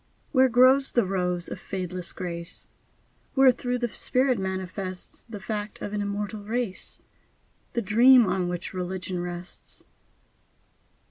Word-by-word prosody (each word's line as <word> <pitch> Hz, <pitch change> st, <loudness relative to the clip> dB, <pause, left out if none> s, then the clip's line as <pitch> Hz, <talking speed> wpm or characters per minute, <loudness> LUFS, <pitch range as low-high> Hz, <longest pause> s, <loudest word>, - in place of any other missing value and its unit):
Where 260 Hz, -2 st, +5 dB
grows 260 Hz, +3 st, +5 dB
the 240 Hz, -4 st, +3 dB
rose 180 Hz, -2 st, -1 dB
of -, -, -6 dB
fadeless 180 Hz, -2 st, -4 dB
Grace? 170 Hz, -2 st, -5 dB, 0.7 s
Wherethrough 255 Hz, -2 st, +4 dB
the 240 Hz, -1 st, -1 dB
Spirit 255 Hz, +1 st, +1 dB
manifests 190 Hz, 0 st, -4 dB
The 225 Hz, -3 st, -9 dB
fact 210 Hz, 0 st, -4 dB
of 205 Hz, -, -5 dB
an 210 Hz, -, -1 dB
immortal 205 Hz, +1 st, -3 dB
race, 220 Hz, -1 st, -2 dB, 0.8 s
The 235 Hz, -, 0 dB
dream 240 Hz, +4 st, +7 dB
on 180 Hz, -1 st, 0 dB
which 175 Hz, +1 st, -4 dB
religion 185 Hz, 0 st, -3 dB
rests. 175 Hz, 0 st, -8 dB
200 Hz, 125 wpm, -26 LUFS, 180-240 Hz, 0.8 s, dream